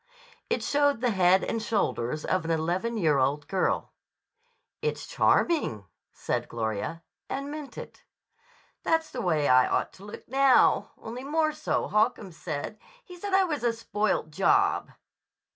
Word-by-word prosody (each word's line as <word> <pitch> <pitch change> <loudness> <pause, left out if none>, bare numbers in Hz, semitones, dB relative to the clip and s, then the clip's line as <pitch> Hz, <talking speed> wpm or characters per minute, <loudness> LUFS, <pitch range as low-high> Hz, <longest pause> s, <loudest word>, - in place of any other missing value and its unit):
It - - 0
showed 285 -3 +2
the 245 0 +1
head 190 -1 +4
and 225 - -2
shoulders 155 - -1
of 185 -2 0
an 165 - -5
eleven 175 +8 -1
year 155 -8 +2
old 145 +3 0
girl. 190 +1 0 0.9
"It's 460 - -2
charming," 205 - +1 0.3
said - - -3
Gloria, 110 +8 -3 0.3
and 275 +1 -4
meant 300 -2 -8
it. - - -9 0.8
"That's 325 -1 0
the 250 - -4
way 155 -7 +1
I 130 0 +5
ought - - -1
to 190 - -15
look 210 - -10
now, 270 +1 +4
only 240 +3 -7
more 310 +2 +1
so, 305 0 -2
Holcomb 215 -2 +1
said. 160 +5 -6 0.3
He 360 - -11
said 380 +2 -2
I 385 - +5
was 300 -8 -2
a 235 -1 +2
spoilt 215 -7 -1
job." 395 - +2
215 Hz, 150 wpm, -27 LUFS, -, 0.9 s, I